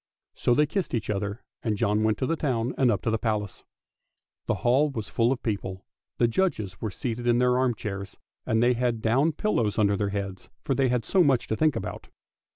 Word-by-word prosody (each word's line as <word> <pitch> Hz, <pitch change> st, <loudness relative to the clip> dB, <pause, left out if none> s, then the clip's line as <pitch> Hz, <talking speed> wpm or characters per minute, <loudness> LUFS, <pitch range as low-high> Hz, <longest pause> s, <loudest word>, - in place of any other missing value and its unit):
So 120 Hz, -, +1 dB
they 150 Hz, -, +4 dB
kissed 180 Hz, -3 st, -2 dB
each 110 Hz, -2 st, -2 dB
other, 100 Hz, +2 st, -3 dB, 0.2 s
and 110 Hz, -3 st, -1 dB
John 105 Hz, +2 st, +1 dB
went 110 Hz, -1 st, +2 dB
to -, -, -1 dB
the 165 Hz, -, 0 dB
town 125 Hz, -6 st, -1 dB
and 130 Hz, -2 st, +3 dB
up 105 Hz, -, 0 dB
to 115 Hz, -, +1 dB
the 110 Hz, -, 0 dB
Palace. 105 Hz, -4 st, -2 dB, 0.8 s
The -, -, +1 dB
hall 135 Hz, +5 st, +4 dB
was 110 Hz, -7 st, -5 dB
full 115 Hz, +1 st, +2 dB
of 135 Hz, -, -2 dB
people; 95 Hz, -3 st, -3 dB, 0.3 s
the 120 Hz, -, +4 dB
judges 110 Hz, -, -1 dB
were 110 Hz, -, -1 dB
seated 120 Hz, +4 st, -4 dB
in 120 Hz, 0 st, +4 dB
their 125 Hz, 0 st, +3 dB
arm 130 Hz, -2 st, +2 dB
chairs, 100 Hz, -2 st, -6 dB, 0.3 s
and 110 Hz, +1 st, +1 dB
they 125 Hz, +1 st, +4 dB
had 120 Hz, -1 st, 0 dB
down 135 Hz, +8 st, +3 dB
pillows 120 Hz, -, 0 dB
under 100 Hz, -2 st, +3 dB
their 100 Hz, 0 st, -1 dB
heads 100 Hz, -2 st, -5 dB
for 135 Hz, -, 0 dB
they 135 Hz, -1 st, +2 dB
had 125 Hz, -2 st, 0 dB
so 190 Hz, -2 st, +4 dB
much 135 Hz, -5 st, +2 dB
to 110 Hz, -, +1 dB
think 155 Hz, +4 st, +2 dB
about. -, -, -5 dB
115 Hz, 220 wpm, -26 LUFS, 105-130 Hz, 0.8 s, they